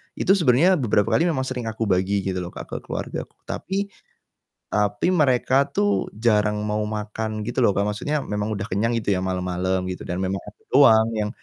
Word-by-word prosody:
itu 190 - +1
sebenarnya 170 +4 +4
beberapa 105 -4 +2
kali 165 - +3
memang 135 -6 0
sering 130 -2 -4
aku 110 0 -3
bagi 95 +2 +1
gitu 95 -1 -2
loh 90 - -5
ke - - -7 0.2
keluargaku, - - -5
tapi 200 +1 -3 0.8
tapi 105 - +1
mereka 135 -5 +3
tuh 100 -8 0
jarang 105 -1 +1
mau 105 0 -1
makan 110 0 -4
gitu 120 +3 -5
loh, 100 - +3
Kak, 100 +1 0
maksudnya 145 +8 -2
memang 105 -2 -3
udah 100 0 -5
kenyang 110 +5 0
gitu 105 - -3
ya - - -1
malam-malam 95 0 -1
gitu 90 - -6
dan 90 +1 -3
memang 95 +1 -1
aku 105 - -13
doang 115 -5 +6
yang 105 -1 -1
105 Hz, 185 wpm, -23 LUFS, 100-125 Hz, 0.8 s, doang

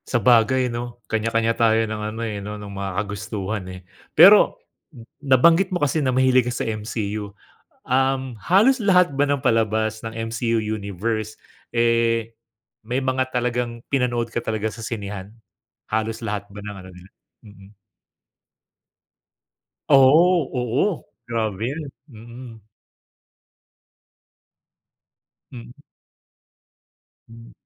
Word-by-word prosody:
Sabagay 125 +2 +3
'no, 120 0 -6
kanya-kanya 115 +1 0
tayo 115 -1 +2
ng 110 -1 -5
ano 115 - -6
eh, 105 -2 -4
'no 105 +1 -6
ng 105 -1 -9
mga 100 0 -4
kagustuhan, 105 0 -4
eh. 95 0 -9 0.4
Pero - - +7 0.3
m 115 - -13 0.2
nabanggit 165 +7 +4
mo 180 - 0
kasi 145 +1 0
na 135 - 0
mahilig 130 -1 +3
ka - - -3
sa 120 - -3
MCU, 105 -1 -4 0.6
um, 130 -1 0
halos 215 +10 +4
lahat 180 - +3
ba 145 - +3
ng 145 -1 0
palabas 110 -1 0
ng 115 - -5 0.2
MCU 115 0 -1
Universe, 110 +1 -4 0.3
eh, 115 -1 +1 0.5
may 125 +2 -2
mga 130 0 -1
talagang 120 -1 -2
pinanood 120 -3 0
ka 115 0 -4
talaga 110 -1 -2
sa 115 +1 -8
sinehan? 100 -3 -6 0.6
Halos 110 +1 -2
lahat 105 -3 -4
ba 105 - -9
ng 105 0 -8
ano 95 - -11
nila? 90 +1 -15 0.3
Mm. 100 -1 -16 2.2
Oo, 155 +5 +5 0.2
oo. 135 - -1 0.2
Grabe 110 -3 -2
'yun, 150 -1 -6 0.2
mm. 115 0 -12 2.9
Mm. 120 0 -10 1.5
Hmm. 115 0 -14
115 Hz, 115 wpm, -22 LUFS, 110-130 Hz, 2.9 s, Pero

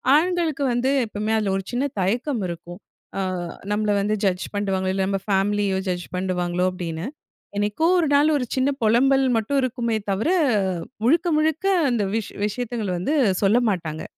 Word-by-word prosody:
ஆண்களுக்கு 330 -3 +1
வந்து 245 +2 +1 0.2
எப்பவுமே 215 0 -2
அதில 210 -3 0
ஒரு 195 - -4
சின்ன 250 +3 0
தயக்கம் 235 +6 0
இருக்கும். 175 +1 -8 0.4
ஆ - - 0 0.5
நம்மள 210 0 0
வந்து 210 +2 0
ஜட்ஜ் 185 -1 0
பண்றுவாங்களோ, 190 -2 0
இல்ல 190 0 0
நம்ம 195 0 0
ஃபேமிலியோ 200 0 +1
ஜட்ஜ் 175 -1 -2
பண்றுவாங்களோ 180 -1 -1
அப்படீன்னு. 170 0 -5 0.5
என்னைக்கோ 210 +11 +1
ஒரு 330 - +2
நாள் 290 +2 +4
ஒரு 255 - -2
சின்ன 265 +1 +2
பொலம்பல் 265 +5 +4
மட்டும் 250 +6 0
இருக்குமே 235 -3 -1
தவிர 205 - 0 0.8
முழுக்க, 330 +7 +3
முழுக்க 315 +3 0 0.3
அந்த 230 -4 +1
விஷ் 225 -2 -3
விஷயத்துங்கள 225 -1 -3
வந்து 285 - 0 0.3
சொல்ல 200 +4 +4
மாட்டாங்க. 160 -5 -3
210 Hz, 150 wpm, -23 LUFS, 190-260 Hz, 0.8 s, நாள்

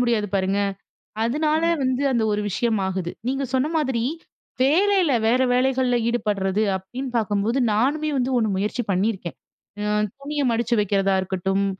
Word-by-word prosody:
முடியாது 235 -4 +1
பாருங்க. 195 +1 +1 0.7
அதனால 305 +6 +1 0.2
வந்து 260 +1 0
அந்த 235 -3 +1
ஒரு 205 - 0
விஷயம் 220 +2 0
ஆகுது. 185 -2 -3 0.2
நீங்க 270 +1 -1
சொன்ன 260 +3 +2
மாதிரி 265 -6 0 0.6
வேலையில 360 +3 +3
வேற 250 +3 +3
வேலைகள்ல 255 -1 +2
ஈடுபடுறது 210 -3 0
அப்டின்னு 245 +8 -6
பார்க்கும்போது 210 +2 0
நானுமே 285 +8 +1
வந்து 255 +1 0
ஒண்ணு 220 - +1
முயற்சி 210 +5 -1
பண்ணியிருக்கேன். 190 -2 -1 0.5
ஆ - - -2 0.4
துணிய 290 +1 -2
மடிச்சு 235 +1 0
வைக்கிறதா 195 -1 +1
இருக்கட்டும் 190 +1 -1
235 Hz, 135 wpm, -23 LUFS, 200-265 Hz, 0.7 s, வேலையில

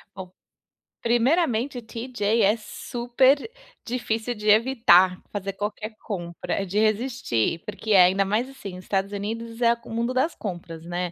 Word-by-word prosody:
Bom, 185 -1 -8 0.7
primeiramente, 245 +1 +1
o - - -5
TJ 230 -1 -1
é 205 +3 +4
super 255 - +1 0.4
difícil 235 -1 -2
de 210 0 -6
evitar 210 -6 +5
fazer 195 -1 -4
qualquer 210 +2 -5
compra, 180 0 -3
de 200 +3 -1
resistir, 215 - 0
porque 215 +1 -5
é 190 -3 +8
ainda 195 +2 +2
mais, 220 +7 0
assim, 200 -9 -9
o 185 - -8
Estados 195 +1 -2
Unidos 225 +3 -5
é 235 0 +5
o - - -11
mundo 235 +2 -1
das 305 +6 +1
compras, 170 -4 -7
né, 175 0 -3
220 Hz, 150 wpm, -25 LUFS, 195-240 Hz, 0.7 s, é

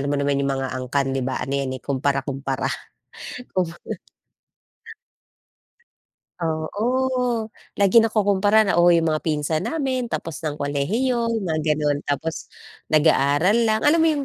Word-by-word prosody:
Alam 140 +1 -1
mo - - +1
naman 140 0 +1
yung 140 - 0
mga 130 -1 -3
angkan, 135 +2 -1
'di 135 -2 -1
ba? 130 - -2
Ano 135 +2 -2
'yan, 135 -1 -2
eh, 130 - -12
kumpara-kumpara. 135 0 -2 0.9
Kum 180 -3 +1 2.7
Oo, 235 +9 -1 0.3
lagi 200 +3 +5
nakukumpara 215 -1 +3
na, 200 - +1
"Oh, 175 - +6
yung 165 -2 +4
mga 155 - -1
pinsan 155 0 -1
namin 260 -6 -1
tapos 165 -7 -5
ng 150 -2 -3
kolehiyo," 225 - 0
yung 225 -4 -1
mga 155 -2 0
gano'n. 145 -1 0
"Tapos, 155 +3 -3 0.4
nag-aaral 160 +8 +3
lang." 220 0 +2
Alam 310 +3 +5
mo 325 - +4
yung 290 -3 0
160 Hz, 145 wpm, -22 LUFS, 140-220 Hz, 2.7 s, Oh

